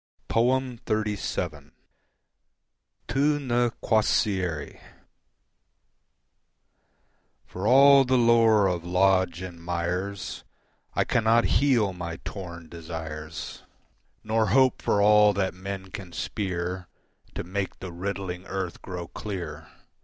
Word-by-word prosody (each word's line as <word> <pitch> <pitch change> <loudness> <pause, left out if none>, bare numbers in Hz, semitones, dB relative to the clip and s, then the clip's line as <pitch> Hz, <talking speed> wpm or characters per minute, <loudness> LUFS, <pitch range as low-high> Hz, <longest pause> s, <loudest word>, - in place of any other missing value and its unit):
XXXVII. 110 - -1 1.3
Tu 145 +2 +2
Ne 120 -3 +1
Quaesieris 95 -7 0 2.7
For 95 +3 -4
all 135 +2 +7
the 130 0 +2
lore 115 -3 +5
of 90 -3 0
Lodge 90 0 +2
and 85 -2 -8
Myers 90 +3 -3 0.5
I - - +3
cannot 115 0 +3 0.2
heal 120 -9 +3
my 85 -2 -5
torn 85 -4 -7
desires, 80 -1 -7 0.6
Nor 110 0 +1
hope 130 +5 +3
for 100 - +2
all 105 0 +6
that 95 -1 -1
man 95 0 -7
can 90 -3 -8
speer 90 -1 -3 0.5
To - - -3
make 95 +2 -4
the 95 - -7
riddling 90 0 -5
earth 95 -3 -4
grow 90 -2 -6
clear. 85 -8 -6
95 Hz, 100 wpm, -26 LUFS, 85-110 Hz, 2.7 s, all